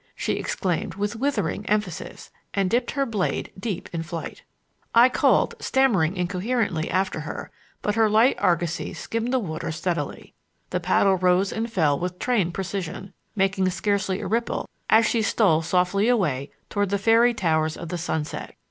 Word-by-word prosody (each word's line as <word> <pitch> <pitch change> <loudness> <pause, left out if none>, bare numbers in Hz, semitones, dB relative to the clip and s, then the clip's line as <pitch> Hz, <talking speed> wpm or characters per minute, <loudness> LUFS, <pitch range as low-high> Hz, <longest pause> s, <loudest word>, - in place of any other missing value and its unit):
she - - -1
exclaimed 180 -4 -2
with 205 +3 -2
withering 275 -3 -1
emphasis, 200 -4 -3 0.2
and 195 -2 +1
dipped 240 +1 +1
her 275 0 0
blade 215 -7 -2
deep 200 -2 -4
in 165 - -2
flight. 165 0 -6 0.5
I 240 +2 +8
called, - - +3
stammering 200 -10 +2
incoherently, 180 -1 -1
after 185 -3 0
her, 155 0 -6 0.3
but 210 - +1
her 220 0 +3
light 225 +5 +4
argosy 170 -1 0
skimmed 230 +2 -3
the 260 - +3
water 160 -9 -3
steadily. 170 +2 -3 0.4
The - - 0
paddle 190 -2 +3
rose 185 +2 +2
and 230 +1 -3
fell 155 -9 +2
with 180 0 -3
trained 200 -9 0
precision, 195 0 -4 0.2
making 195 -1 +2
scarcely 195 +1 -1
a - - -5
ripple 230 +2 -1 0.2
as 225 +1 +6
she 230 +1 +1
stole 195 -7 +3
softly 180 +5 +1
away 150 - +1 0.2
toward 205 -1 -1
the 200 - +1
fairy 230 +4 +4
towers 160 -4 +1
of 170 - -7
the 175 - -3
sunset. 150 -2 -4
195 Hz, 160 wpm, -24 LUFS, 175-225 Hz, 0.5 s, I